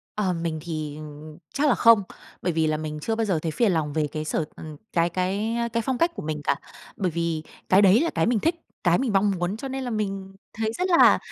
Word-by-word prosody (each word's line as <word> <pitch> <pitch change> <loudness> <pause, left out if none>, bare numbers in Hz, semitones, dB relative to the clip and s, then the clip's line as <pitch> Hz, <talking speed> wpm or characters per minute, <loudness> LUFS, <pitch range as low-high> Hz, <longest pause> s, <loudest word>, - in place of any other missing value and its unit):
Ờ, 195 -4 0
mình 165 -2 -3
thì 155 -3 -5 0.5
chắc 295 +2 +2
là - - +4
không, 230 -4 +6 0.4
bởi 175 - 0
vì 160 -1 +2
là 155 0 +1
mình 155 -1 -5
chưa 225 +5 -1
bao 225 -1 0
giờ 180 -6 +1
thấy 160 - -2
phiền 220 +2 +2
lòng 150 -3 -1
về 155 -2 +1
cái 155 0 -4
sở 155 - -1
ừm, 155 -2 -9 0.2
cái 170 0 +3
cái, 195 +6 -1
a, 235 0 0
cái 230 0 -1
phong 260 -2 0
cách 335 +4 +2
của - - -5
mình 150 -1 -3
cả 140 - +2 0.4
bởi 185 -4 0
vì 165 -1 -2 0.3
cái 190 +2 +6
đấy 200 +6 +6
là 335 - +1
cái - - +2
mình 230 -2 +2
thích, 330 - +1 0.3
cái 175 -1 +4
mình 250 -6 -1
mong 200 +1 +3
muốn 180 +5 -1
cho 270 - -5
nên 265 0 -4
là 245 - -3
mình 195 -3 -3 0.2
thấy 220 0 -1
rất 365 - 0
là 340 - +7
190 Hz, 255 wpm, -25 LUFS, 160-225 Hz, 0.5 s, là